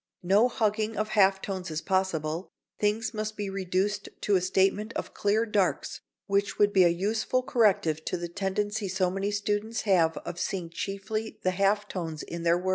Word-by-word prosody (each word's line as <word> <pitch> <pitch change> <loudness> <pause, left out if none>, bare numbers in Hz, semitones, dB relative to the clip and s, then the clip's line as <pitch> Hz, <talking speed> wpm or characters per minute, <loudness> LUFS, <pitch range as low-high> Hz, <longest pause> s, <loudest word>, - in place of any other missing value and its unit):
No 200 +7 +5
hugging 220 -2 0
of 215 0 -1
half 195 -2 +3
tones 190 -3 -4
is 155 -1 -2
possible, 170 -2 -1 0.3
things 215 +1 0
must 215 0 -4
be 205 -2 -3
reduced 195 +2 -1
to 205 - +2
a 185 - +3
statement 195 +4 +1
of - - -5
clear 210 +3 +1
darks 210 -4 0 0.2
which 200 0 0
would 205 0 +3
be 190 -2 +6
a - - +6
useful 220 +8 0
corrective 190 -11 +2
to 180 - -1
the 175 0 -4
tendency 200 +3 -2
so 185 -1 0
many 195 +2 -1
students 210 +2 -1
have 170 -6 +3
of 175 - -6
seeing 175 -4 -3
chiefly 200 +5 -4
the 185 - +2
half 200 +2 +1
tones 165 -6 -5
in 170 0 -6
their 170 +1 +3
work. 185 +1 -3
195 Hz, 185 wpm, -28 LUFS, 185-210 Hz, 0.3 s, be